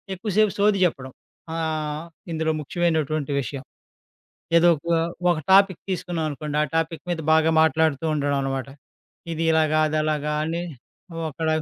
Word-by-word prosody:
ఎక్కువసేపు 210 0 +1
సోది 205 -1 +3
చెప్పడం. 135 -6 -3 0.4
ఆహ్, 155 -1 -2 0.3
ఇందులో 160 0 0
ముఖ్యమైనటువంటి 155 -2 -1
విషయం. 135 +2 -6 0.9
ఏదో 175 +1 +5
ఒక 170 - -14 0.4
ఒక 165 - 0 0.2
టాపిక్ 195 -3 +5
తీసుకున్నాం 175 -3 -2
అనుకోండి, 150 +1 -4
ఆ - - +1
టాపిక్ 165 -2 -2
మీద 170 - -2
బాగా 160 0 +4
మాట్లాడుతూ 160 -1 +2
ఉండడం 145 -1 0
అనమాట. 135 -1 -3 0.7
ఇది 165 +1 -2
ఇలాగా, 155 -1 +3
అదలాగా 155 -1 -1
అని. 165 +2 -2 0.5
ఓ - - -6
అక్కడ 160 +3 -3
160 Hz, 135 wpm, -23 LUFS, 150-170 Hz, 0.9 s, ఏదో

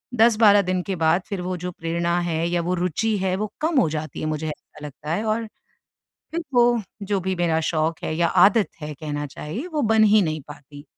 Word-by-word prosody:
10-12 220 -3 +6
दिन 185 -1 -1
के 195 0 -3
बाद 165 +4 +3
फिर 200 -3 -3
वो 180 +1 -3
जो 180 +1 -5
प्रेरणा 170 +1 -1
है, 165 +1 0
या 175 0 0
वो 175 +2 -1
रूचि 215 +6 0
है, 190 -1 0
वो 210 +1 -3
कम 315 -2 +2
हो 165 - +1
जाती 155 0 -5
है, - - -2
मुझे 155 0 -2
ऐसा 150 0 -9
लगता 150 +2 -7
है 200 +6 -1
और, 220 +1 -1 0.9
फिर 335 +1 -2
वो, 240 -1 +4 0.2
जो 200 0 -1
भी 190 +1 -1
मेरा 165 -2 +1
शौक़ 165 +2 -1
है - - -2
या 170 0 +3 0.2
आदत 210 0 +2
है 150 0 -5
कहना 145 0 -4
चाहिए, 155 - -6
वो 300 -2 0
बन 220 -1 +4
ही 215 0 +5
नहीं 155 -3 -2
पाती। 145 -1 -12
180 Hz, 220 wpm, -23 LUFS, 155-215 Hz, 0.9 s, 10-12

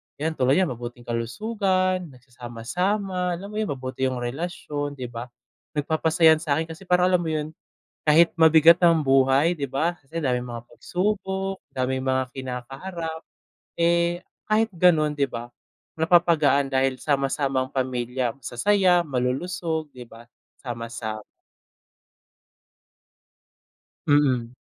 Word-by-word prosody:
Yan 155 +3 -2
tulad 135 -3 +2
niyan 185 -7 +2
mabuting 120 0 -8
kalusugan, 185 - -1
nagsasama-sama, 175 - -3
alam 200 +4 -9
mo 210 - -3
yun 215 - -1
mabuti 130 -1 -3
yung 125 -1 -3
relasyon 145 +1 -4
'di 125 -3 -7
ba. 120 +1 -6 0.5
Nagpapasaya'n 160 +1 +3
sa 155 -3 0
'kin 160 +2 -3
kasi 180 +4 -11
parang 180 +1 +3
alam 180 - +4
mo 170 - -3
yun, 155 -1 -2 0.5
kahit 165 +3 +4
mabigat 160 +1 +6
ang 170 -2 +5
buhay 135 +5 +4
'di 140 -4 -5
ba 165 +6 0
kasi 160 +5 -6
daming 125 -4 -1
mga 120 0 -8
pagsubok, 190 0 -3
daming 130 0 -2
mga 130 0 +1
kinakaharap. 135 +6 -6 0.5
Eh, 170 +1 +1 0.2
kahit 220 +1 +2
ganun 165 -5 +3
'di 140 - +3
ba 120 -2 -7 0.4
napapagaan 160 -5 +3
dahil 130 0 +1
sama-samang 135 -2 0
pamilya, 125 -2 -2
masasaya, 175 - +2
malulusog, 155 +4 -2
'di 125 -2 -11
ba 115 +1 -14 0.3
sama-sa 115 -3 -6 2.9
Mm. 130 -5 +2
145 Hz, 120 wpm, -24 LUFS, 130-175 Hz, 2.9 s, mabigat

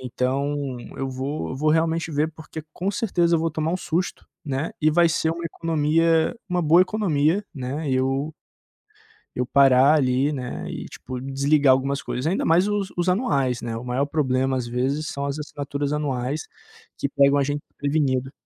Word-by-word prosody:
Então, 135 +2 -2 0.2
eu 135 0 -3
vou 130 +1 -4
vou 155 +2 +2
realmente 165 +1 +1
ver, 150 +1 +1
porque 160 0 -9
com 190 +3 -2
certeza 175 -6 +1
eu - - 0
vou 165 - +1
tomar 155 +1 -1
um - - +1
susto, 175 0 -3 0.2
né, 140 +2 -2
e 155 0 +4
vai 170 +1 +4
ser 160 0 +1
uma 170 +1 -4
economia, 165 +3 +1
uma 180 0 0
boa 170 +3 +6
economia, 185 -2 +1
né, 140 +3 -4
eu 135 +4 0 1.0
eu 125 - 0
parar 135 +2 +5
ali, 135 +1 +2
né, 125 -3 -5
e - - -6
tipo, 125 -1 -7
desligar 135 +1 +3
algumas 135 +2 0
coisas, 125 - -4
ainda 175 +5 0
mais 175 +5 +4
os 205 -2 0
os 175 +1 0
anuais, 140 - +1
né, 115 -1 -4
o 115 - -6
maior 125 +3 0
problema 135 -3 0
às 125 -2 -2
vezes 135 +6 -1
são 140 0 -3
as 140 +1 -3
assinaturas 145 -1 -4
anuais 145 0 -2 0.5
que 140 - -2
pegam 140 0 +4
a 140 - +3
gen 145 +1 -2 0.2
prevenido. 135 -3 0
145 Hz, 175 wpm, -23 LUFS, 135-160 Hz, 1.0 s, boa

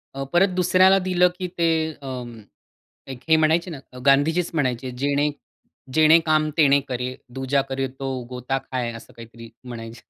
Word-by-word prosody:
अ, 135 - -3
परत 185 +3 +5
दुसऱ्याला 185 +1 +4
दिलं 180 -1 +3
की 180 - -3
ते 165 -1 +2 0.3
अं, 125 -3 -6 0.7
एक 130 -2 -8
हे 160 - +6
म्हणायचे 160 +3 +2
ना, 145 - -7
अ, - - -11
गांधीजीच 155 +6 +3
म्हणायचे, 130 -4 -1
"जेणे 145 +2 +1 0.7
जेणे 155 +1 +6
काम 155 -1 +2
तेणे 140 -3 +5
करे, 125 0 -3 0.2
दुजा 135 +1 0
करे 135 0 -1
तो 135 -1 -4 0.2
गोता 125 +2 -3
खाए," 125 -3 -4
असं 115 - -12
काहीतरी 115 0 -12 0.2
म्हणायचे. 115 -1 -9
135 Hz, 160 wpm, -23 LUFS, 125-160 Hz, 0.7 s, हे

